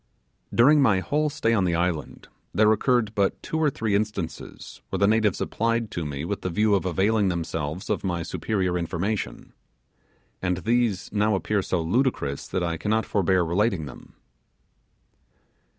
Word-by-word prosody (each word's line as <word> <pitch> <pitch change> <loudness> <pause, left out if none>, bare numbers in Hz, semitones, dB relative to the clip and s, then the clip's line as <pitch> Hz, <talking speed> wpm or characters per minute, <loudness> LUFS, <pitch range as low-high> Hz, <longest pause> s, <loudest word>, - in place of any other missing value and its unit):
During 145 +5 +5
my 110 -8 +4
whole 150 - 0
stay 130 -6 0
on 105 -4 +2
the 85 -2 +1
island 85 -2 -2 0.3
there 110 0 +5
occurred 110 0 +2
but 100 -2 +1
two 160 - -2
or 155 -2 +3
three 110 -6 -2
instances 100 -5 -4
where - - -2
the 100 - +3
natives 105 -2 +2
applied 115 -1 -1
to 85 -5 -3
me 70 +1 -4
with 100 +2 -3
the 90 - -2
view 105 +4 +2
of 95 -2 +1
availing 100 +4 +2
themselves 85 0 -3
of - - -1
my 85 -3 -1
superior 90 0 -1
information; 95 +5 -3 0.9
and 90 -1 0
these 115 -1 0
now 105 0 +2
appear 100 +1 0
so 90 -2 -1
ludicrous 85 - 0
that 95 - -2
I 85 -1 -1
cannot 110 +5 0
forbear 95 -2 +2
relating 90 0 0
them. 70 - -12
100 Hz, 160 wpm, -25 LUFS, 85-110 Hz, 0.9 s, During